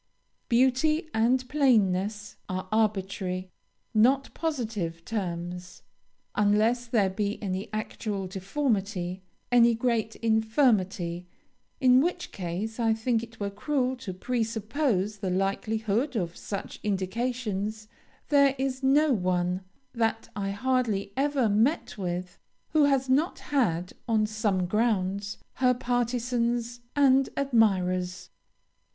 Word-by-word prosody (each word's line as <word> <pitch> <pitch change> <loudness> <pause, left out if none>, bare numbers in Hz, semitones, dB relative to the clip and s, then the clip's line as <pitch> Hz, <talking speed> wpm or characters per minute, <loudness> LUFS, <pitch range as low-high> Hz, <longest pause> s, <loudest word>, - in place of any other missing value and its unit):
Beauty 265 +6 +2
and 250 +3 +2
plainness 210 -7 +1
are 185 +1 -3
arbitrary, 190 -4 -1 0.4
not 260 +5 +3
positive, 215 - -3
terms. 180 -3 -5 0.5
Unless 215 +4 +2
there 220 -4 +2
be 200 +2 -2
any 195 0 -4
actual 210 -2 -3
deformity, 195 -2 -2 0.3
any 235 -1 +6
great 225 -2 0
infirmity, 220 -6 +1 0.5
in 255 -2 +6
which 350 +3 -2
case 195 +6 -4
I 225 -1 +3
think 225 0 0
it 230 -1 -11
were 200 -1 -2
cruel 260 +4 -1
to 215 -5 -6
pre 235 +6 -1
suppose 220 -2 -1
the 195 -2 -2
likelihood 220 +6 0
of 175 -5 -2
such 200 - -6
indications, 215 +1 -2 0.4
there 280 -2 +5
is 265 0 -2
no 280 +2 +4
one, 180 -2 0 0.3
that 225 -1 -1
I 200 -1 -2
hardly 215 -3 0
ever 275 -3 +2
met 225 +10 +1
with, 180 -1 -4 0.3
who 305 -2 +4
has 270 -2 +2
not 285 +7 +2
had, 180 - 0
on 220 -2 +3
some 210 -4 0
grounds, 200 -1 0 0.2
her 250 -1 +4
partizans 240 -1 -1 0.2
and 270 -2 +4
admirers. 185 -9 +1
220 Hz, 110 wpm, -27 LUFS, 195-250 Hz, 0.5 s, any